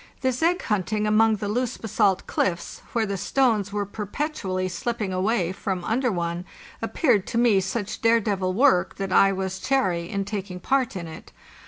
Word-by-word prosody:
This 260 0 0
egg 350 +3 +2
hunting 210 +1 0
among 220 +1 +4
the 205 0 -4
loose 245 +3 -1
basalt 205 -3 +1
cliffs, 170 -2 -2
where 230 -2 +1
the 200 -1 -3
stones 215 -1 +1
were 205 0 -1
perpetually 205 -2 -3
slip 230 +7 -3
ping 195 -4 -2
away 185 -1 +1
from 190 -1 -3
under 245 +5 +1
one, 170 -1 -2 0.4
appeared 235 - +1
to - - -2
me 235 -4 +4
such 195 +2 -4
dare 230 0 +5
devil 195 -4 -1
work 235 -2 +3
that 195 -1 -3
I 195 +1 +6
was 190 -1 -3
chary 185 -11 0
in 200 0 -2
taking 195 -3 -5
part 260 +1 0
in 170 -3 -5
it. 160 - -11
205 Hz, 180 wpm, -24 LUFS, 185-230 Hz, 0.4 s, I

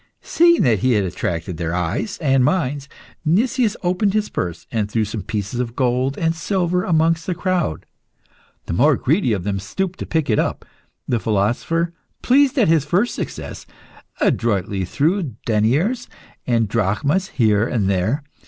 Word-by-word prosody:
Seeing 340 0 +4
that 115 -6 +3
he 130 +5 +2
had 105 -3 +2
attracted 85 -2 -3
their 85 0 -2
eyes 90 - -2
and 135 -4 +2
minds, 140 -4 0 0.3
Nicias 220 +7 +1
opened 185 +3 +1
his 210 -1 0
purse 85 -1 -4
and 110 -3 -1
threw 110 0 0
some 105 +1 -5
pieces 105 +3 -4
of 120 -1 -3
gold 130 +1 0
and 165 0 +1
silver 180 +1 0
amongst 165 -1 +1
the 180 - -1
crowd. 180 - -1 0.8
The - - -4
more 140 - +4
greedy 150 - +1
of 100 -5 -1
them 100 0 -2
stooped 185 - -4
to - - -5
pick 160 -3 0
it 110 - +2
up. - - -2 0.4
The 120 - +1
philosopher, 120 +12 0 0.3
pleased 275 +2 +4
at 230 - +4
his 160 -3 +3
first 205 +8 +1
success, - - -6 0.5
adroitly 100 -4 0
threw 155 - 0
deniers 140 - +1 0.4
and 115 -3 +2
drachmas 120 - 0
here 110 -2 +3
and 110 -7 0
there. 100 +10 0
130 Hz, 160 wpm, -20 LUFS, 105-175 Hz, 0.8 s, Seeing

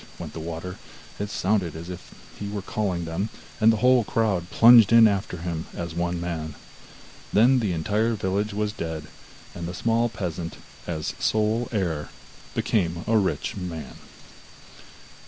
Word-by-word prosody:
went - - -7
the - - -6
water; 85 +3 -6 0.4
it 105 0 -3
sounded 95 -5 0
as 80 +2 -7
if 90 -1 -9 0.2
he 100 - -5
were 100 -1 -4
calling 95 -5 -2
them, 85 +6 -2 0.3
and 110 0 +6
the 110 - +1
whole 125 -2 +6
crowd 100 -6 0
plunged 115 -1 +8
in 115 -1 +8
after 100 -3 -1
him 80 -1 -4
as 85 -1 -4
one 85 +1 -1
man. 80 -3 -4 0.8
Then 125 +5 +5
the 105 -5 0
entire 105 +8 +1
village 100 +2 -1
was 105 +1 -1
dead, 80 -4 -5 0.5
and 85 -1 -5
the 90 - -5
small 115 +3 +1
peasant, 90 -6 -5 0.3
as 80 -3 -3
sole 110 +2 +1
heir, 85 -9 -1 0.5
became 85 -4 0
a 115 - +2
rich 100 -4 0
man. 85 -7 -6
95 Hz, 155 wpm, -25 LUFS, 85-110 Hz, 0.8 s, plunged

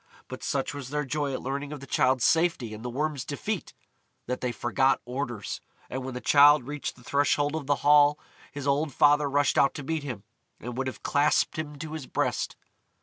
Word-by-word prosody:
But - - -8
such 135 0 -1
was 140 -3 -7
their 150 0 -2
joy 145 +1 -1
at 130 - -4
learning 140 +2 -3
of 150 - -6
the 140 - -10
Childe's 130 -2 +2
safety 160 -9 +2
and 110 +1 -9
the 125 - -3
Worm's 145 +1 -2
defeat, 155 +7 -4 0.5
that 125 +1 -3
they 125 - -1
forgot 130 +3 +1
orders, 120 -4 -4 0.3
and 130 0 -3
when 130 -1 -6
the - - -3
Childe 145 -2 +6
reached 145 0 -4
the 125 - -18
threshold 145 +2 +1
of 150 -4 -4
the 145 - +3
Hall 145 0 +6 0.3
his 145 -1 -6
old 145 +2 +1
father 145 0 +4
rushed 145 +1 +2
out 140 - +3
to 145 - -6
meet 160 +2 -2
him, 125 -8 -6 0.4
and 120 +1 -6
would 135 +1 -2
have 130 - -7
clasped 145 +2 +2
him 150 -1 -5
to 155 +1 -7
his 155 -5 -6
breast. - - -1
140 Hz, 205 wpm, -27 LUFS, 130-150 Hz, 0.5 s, Childe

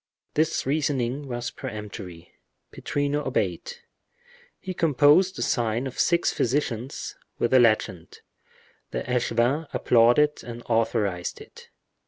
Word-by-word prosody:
This 155 +2 +1
reasoning 140 -2 -1
was 120 -1 -4
peremptory—Pittrino 105 - -6
obeyed. 485 - -2 0.9
He 185 - -5
composed 165 +4 +4
the - - -2
sign 115 +1 0
of 130 - -6
six 170 0 +2
physicians, 125 -1 -2 0.2
with 120 - 0
the 130 - +6
legend; 110 -7 +1 0.7
the - - -3
echevin 125 +4 0
applauded 120 +6 +3
and 120 0 -8
authorized 110 -6 0
it. - - -14
125 Hz, 105 wpm, -25 LUFS, 115-145 Hz, 0.9 s, the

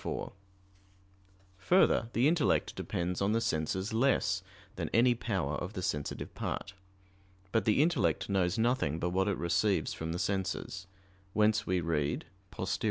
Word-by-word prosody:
4: - - -4 1.3
Further, 170 - +3
the 125 +4 +3
intellect 165 0 +2
depends 90 +1 -3
on 100 +2 +2
the 115 - +3
senses 95 +3 -1
less 130 +4 +2 0.3
than - - -3
any 120 +2 +5
power 95 - -2
of 90 +4 -5
the 95 - -4
sensitive 75 -6 -3
part. 100 - -4 0.8
But 110 - +1
the 110 +6 +4
intellect 125 - +1
knows 95 -2 +1
nothing 110 - +1
but 90 +1 -1
what 95 +2 +1
it 100 - 0
receives 90 +4 +1
from 80 0 -4
the 85 - -2
senses; 95 0 -2 0.5
whence 105 0 +2
we 90 -1 +1
read 75 -3 -1 0.2
(Poster. 95 -1 -3
95 Hz, 150 wpm, -31 LUFS, 90-115 Hz, 1.3 s, any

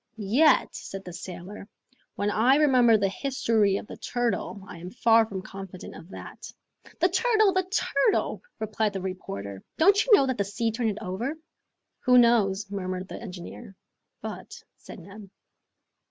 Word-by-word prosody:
"Yet," 230 +10 +3
said 195 0 -8
the 180 - -8
sailor, 185 +3 -8 0.5
"when 205 +1 -1
I 240 +6 +4
remember 255 -6 +5
the 200 -1 +1
history 225 -4 +1
of - - -7
the - - -10
turtle, 205 -5 -2
I 180 -3 -10
am 175 +2 -7
far 225 +1 +4
from 190 -3 -6
confident 195 -2 -9
of 165 - -12
that." - - -10 0.5
"The - - +4
turtle! 435 -5 +3
the 375 -1 +1
turtle!" 430 +2 +1 0.2
replied 215 -1 -1
the 195 - -4
reporter. 100 - -6 0.2
"Don't 400 +6 +5
you - - -3
know 275 - +3
that 260 -4 -2
the - - +3
sea 215 +3 -2
turned 225 0 -1
it 205 - -4
over?" 235 +12 -3 0.7
"Who 250 -1 +6
knows?" 215 -5 +4
murmured 185 -1 -4
the - - -7
engineer. 195 +1 -9 0.5
"But, - - -8
" - - -56
said - - -12
Neb. 195 +2 -12
210 Hz, 165 wpm, -26 LUFS, 190-245 Hz, 0.7 s, Who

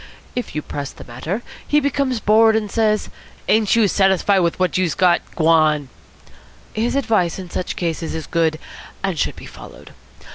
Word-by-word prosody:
If 245 -9 -4
you 150 - -2
press 140 -1 -5
the - - -12
matter, 155 - -5 0.2
he 295 - +4
becomes 275 -3 0
bored, 220 +1 +4
and 210 -2 -1
says, 215 -2 +1 0.4
'Ain't 215 -1 +3
youse 220 -4 +3
satisfied 195 0 +3
with 170 -2 0
what 185 -1 0
youse 180 -3 +1
got? 180 -2 +3
G'wan!' 155 -4 +3 0.8
His 230 +4 -1
advice 220 -11 +1
in 185 -2 -8
such 180 - -3
cases 165 -2 -3
is 160 -2 -4
good, 165 -2 0 0.5
and 190 -6 -1
should - - 0
be - - -11
followed. - - -12
190 Hz, 170 wpm, -20 LUFS, 165-220 Hz, 0.8 s, he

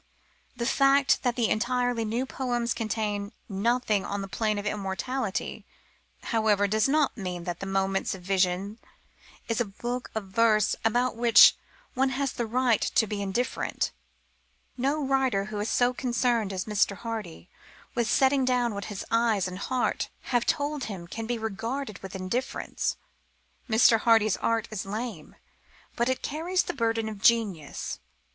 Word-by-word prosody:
The 235 -1 -3
fact 275 +1 +4
that 245 -2 0
the 235 -3 +2
entirely 245 0 0
new 235 +4 -1
poems 240 -3 -1
contain 215 -3 -2
nothing 215 0 +1
on 200 0 -3
the - - -5
plane 215 +1 -1
of 205 - -4
immortality, 210 +3 -3 0.6
however, 215 -3 +2
does 215 +5 +2
not 300 -1 +2
mean 180 -5 -5
that 175 +1 -5
Moments 195 0 0
of 185 - -12
Vision 190 +3 0 0.7
is 230 +1 0
a - - +1
book 240 +5 -5
of 220 - -1
verse 215 +1 +3
about 245 +3 +1
which 230 -2 +7 0.4
one 265 +1 +2
has 275 -2 0
the 235 - -3
right 245 -1 +2
to 220 - +2
be 205 -1 -4
indifferent. 200 +6 -1 0.8
No 275 +3 0
writer 265 -7 +1
who 210 0 -5
is 210 - -2
so 245 0 +2
concerned 240 -4 0
as 185 -1 -3
Mr. 205 -2 +1
Hardy 220 -8 -6 0.5
with 235 -2 0
setting 265 +2 +3
down 250 -2 +1
what 200 -1 -5
his 205 -2 -6
eyes 225 -4 +2
and 185 0 -6
heart 255 +4 -1 0.2
have 240 -1 +2
told 290 -1 0
him 190 -5 -6
can 225 +5 -5
be 240 0 -1
regarded 220 +2 -4
with 195 0 -9
indifference. 190 +7 -2 0.7
Mr. 225 0 +5
Hardy's 220 -3 +4
art 230 -1 0
is 215 -3 -3
lame, 220 +4 -6 0.6
but 240 +1 +1
it 260 - -1
carries 345 +5 0
the - - -4
burden 225 -3 0
of 210 -2 -7
genius. 210 -10 +1
225 Hz, 155 wpm, -27 LUFS, 200-245 Hz, 0.8 s, which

